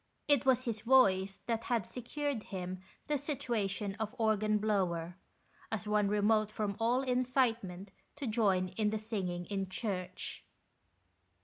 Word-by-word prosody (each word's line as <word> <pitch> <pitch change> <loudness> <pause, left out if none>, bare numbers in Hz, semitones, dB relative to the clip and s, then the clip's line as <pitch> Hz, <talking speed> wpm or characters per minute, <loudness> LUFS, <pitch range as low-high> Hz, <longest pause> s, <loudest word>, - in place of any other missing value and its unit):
It 285 -3 +4
was 255 -1 +4
his 225 -3 -2
voice 195 -6 +4
that 230 -1 -1
had 235 -6 +1
secured 255 0 -3
him 185 -1 -5 0.2
the 295 -2 0
situation 215 -8 -2
of 220 -1 -3
organ 215 -1 +2
blower, 180 -5 0 0.6
as 215 -1 -3
one 210 -1 +3
remote 210 +1 +2
from 210 -2 -2
all 240 +3 +2
incitement 240 -7 0 0.2
to 290 -1 -5
join 200 -5 +2
in 210 +3 0
the 220 - -1
singing 190 -5 -3
in 195 -1 -3
church. 185 -3 -4
215 Hz, 135 wpm, -33 LUFS, 195-240 Hz, 0.6 s, It